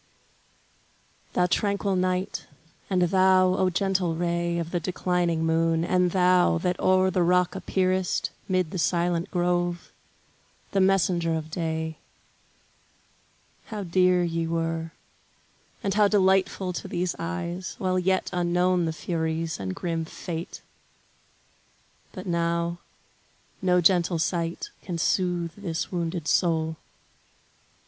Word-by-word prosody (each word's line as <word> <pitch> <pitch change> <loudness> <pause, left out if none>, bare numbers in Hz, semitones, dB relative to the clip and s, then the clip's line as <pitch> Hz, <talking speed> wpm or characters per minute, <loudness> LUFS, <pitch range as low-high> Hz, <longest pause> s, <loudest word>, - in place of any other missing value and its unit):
Thou 180 - +3
tranquil 200 +1 0
night, 185 +1 -1 0.4
and 185 -2 +2
thou, 185 0 +4
O 185 0 +2
gentle 185 -2 0
ray 170 0 -1
Of 170 -1 -3
the 175 - 0
declining 175 -1 0
moon; 165 0 +2
and 180 0 +2
thou, 180 -1 +3
that 180 +2 -1
o'er 185 0 +3
The 185 - +1
rock 180 +1 +3
appearest, 185 -1 0 0.2
'mid 185 -4 0
the 185 - -3
silent 170 0 0
grove, 175 -1 -1 0.8
The 195 - +2
messenger 180 -3 +2
of 160 0 -5
day; 160 -1 -3 1.7
how 210 -2 -5
dear 180 0 +3
ye 165 -1 -1
were, 165 0 -2 0.9
And 195 - 0
how 210 -1 +4
delightful 190 -2 +2
to - - -5
these 175 0 -2
eyes, 175 +1 -4
while 185 -1 0
yet 185 +1 0
Unknown 180 0 +2
the 160 - -2
furies, 160 0 -2
and 95 -1 -4
grim 165 -2 -2
Fate! 165 +1 -7 1.5
But 185 -3 -8
now, 170 0 -1 0.8
No 180 -1 +3
gentle 175 -1 +3
sight 170 - -2
can 175 -3 -5
soothe 175 0 0
this 175 -5 -4
wounded 170 -2 -3
soul. 160 -2 +1
175 Hz, 120 wpm, -26 LUFS, 165-185 Hz, 1.7 s, thou